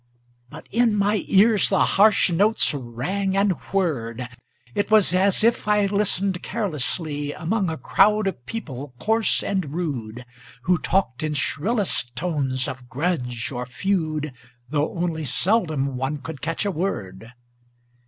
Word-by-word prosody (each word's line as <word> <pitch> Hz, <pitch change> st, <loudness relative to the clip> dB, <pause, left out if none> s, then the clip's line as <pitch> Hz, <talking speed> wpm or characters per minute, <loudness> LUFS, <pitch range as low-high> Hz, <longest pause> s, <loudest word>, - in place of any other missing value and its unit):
But -, -, -11 dB
in 230 Hz, -1 st, +3 dB
my 205 Hz, 0 st, +1 dB
ears 210 Hz, +1 st, +5 dB
the 190 Hz, -, +3 dB
harsh 205 Hz, -2 st, +4 dB
notes 205 Hz, +4 st, +3 dB
rang 150 Hz, +11 st, -2 dB
and 200 Hz, 0 st, +3 dB, 0.2 s
whirred; 125 Hz, -11 st, -1 dB, 0.5 s
It 205 Hz, -, -1 dB
was 215 Hz, -4 st, +4 dB
as 195 Hz, +2 st, +4 dB
if 230 Hz, -1 st, +2 dB
I 210 Hz, -1 st, +3 dB
listened 200 Hz, -2 st, 0 dB
carelessly 150 Hz, -, -3 dB
Among 190 Hz, +2 st, -1 dB
a 160 Hz, -, -3 dB
crowd 210 Hz, +5 st, +3 dB
of 185 Hz, -11 st, -3 dB
people 140 Hz, -, -6 dB
coarse 220 Hz, -, +1 dB
and 180 Hz, -7 st, -2 dB
rude, 125 Hz, -9 st, -4 dB, 0.4 s
Who 180 Hz, 0 st, +2 dB
talked 130 Hz, -1 st, 0 dB
in 155 Hz, -1 st, -2 dB
shrillest 170 Hz, -, 0 dB
tones 135 Hz, -4 st, -1 dB
of 125 Hz, -1 st, -8 dB
grudge 130 Hz, -6 st, -2 dB
or 125 Hz, -1 st, -4 dB
feud, 155 Hz, 0 st, -1 dB, 0.4 s
Though 150 Hz, 0 st, 0 dB
only 165 Hz, -2 st, -1 dB
seldom 155 Hz, -, 0 dB
one 135 Hz, +3 st, -2 dB
could 145 Hz, -1 st, -8 dB
catch 165 Hz, +5 st, -2 dB
a 200 Hz, -, +1 dB
word. 115 Hz, -, -4 dB
165 Hz, 140 wpm, -23 LUFS, 135-200 Hz, 0.5 s, ears